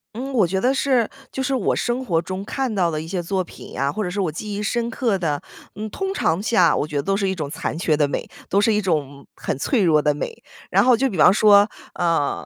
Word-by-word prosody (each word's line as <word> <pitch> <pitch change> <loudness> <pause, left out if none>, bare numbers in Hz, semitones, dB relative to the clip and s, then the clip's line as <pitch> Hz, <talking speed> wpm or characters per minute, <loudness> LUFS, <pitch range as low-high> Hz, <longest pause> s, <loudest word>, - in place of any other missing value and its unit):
嗯， 265 +3 -5
我 215 -7 +4
觉 190 +3 -1
得 255 +5 +2
是 260 -5 +1 0.2
就 265 - -3
是 265 +1 0
我 240 - +1
生 245 +2 -1
活 170 -8 +1
中 185 +2 -5
看 260 +1 -2
到 175 -4 +1
的 155 - -2
一 160 - -8
些 180 -1 -3
作 190 +2 -1
品 - - -11
啊， 140 0 +1
或 215 - -2
者 180 - -2
是 200 +3 -4
我 180 -5 +1
记 205 +7 -6
忆 205 - -3
深 235 +3 -1
刻 225 -4 0
的， 150 -5 -1 0.3
嗯， 215 +1 -5
通 385 - -3
常 165 - 0
下 180 -8 +4
我 - - 0
觉 150 -2 -4
得 140 - +1
都 195 +3 0
是 195 -1 0
一 - - 0
种 155 -6 -4
残 160 - -4
缺 160 -3 +1
的 145 -1 +2
美， - - -4 0.2
都 200 - +3
是 215 +1 +3
一 210 - +1
种 145 -6 -2
很 - - -3
脆 230 - +1
弱 155 -4 +4
的 150 -1 +2
美。 450 - -6 0.3
然 - - +4
后 250 -2 +5
就 270 +2 +1
比 190 - -5
方 180 - +7
说， 205 0 +6 0.3
呃， 165 -4 0
195 Hz, 285 characters per minute, -22 LUFS, 165-230 Hz, 0.3 s, 方